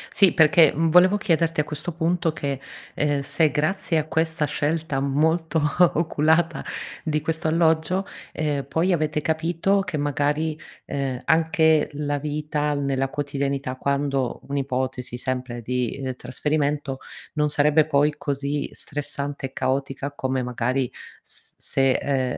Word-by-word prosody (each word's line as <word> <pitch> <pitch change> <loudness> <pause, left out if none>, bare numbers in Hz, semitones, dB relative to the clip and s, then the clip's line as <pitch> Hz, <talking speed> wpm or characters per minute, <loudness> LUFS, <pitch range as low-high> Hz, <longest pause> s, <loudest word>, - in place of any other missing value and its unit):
Sì, 195 -3 +6
perché, 155 -1 +6
mhmm, 165 +1 +2
volevo 185 +4 +6
chiederti, 165 -5 +1
a - - +4
questo 150 +3 -5
punto, 165 0 0
che, 140 -3 -3 0.4
uhm, 145 -1 +1
se 155 +3 +2
grazie 160 +3 0
a 155 - 0
questa 160 -1 0
scelta 150 0 -1
molto 160 +4 +1 0.4
oculata 160 +1 +2 0.4
di 155 -1 0
questo 160 +1 -1
alloggio, 165 +3 +2 0.3
ehm, 145 -3 -1
poi 175 +4 +1
avete 155 -2 0
capito 165 +5 +1
che, 195 -5 -3
magari, 145 +2 0 0.3
uhm, 135 -2 -2
anche 160 -1 +3
la 145 0 -2
vita 150 0 -1
nella 135 -1 0
quotidianità, 140 -2 -2
quando 140 -1 -1
un'ipotesi, 130 -2 -2
sempre 125 -2 -4
di, 125 +2 -2
uhm, 130 -1 -3
trasferimento, 145 +2 -2 0.3
non 150 -1 +1
sarebbe 150 +1 +3
poi 145 +2 +3
così 140 0 -2
stressante 145 -1 -3
e 130 - -21
caotica, 135 +2 -2
come 130 -2 -2
magari 125 +1 -1 0.3
s - - -4
se 135 -1 +2
ehm, 130 -3 -1
150 Hz, 135 wpm, -24 LUFS, 135-160 Hz, 0.4 s, Sì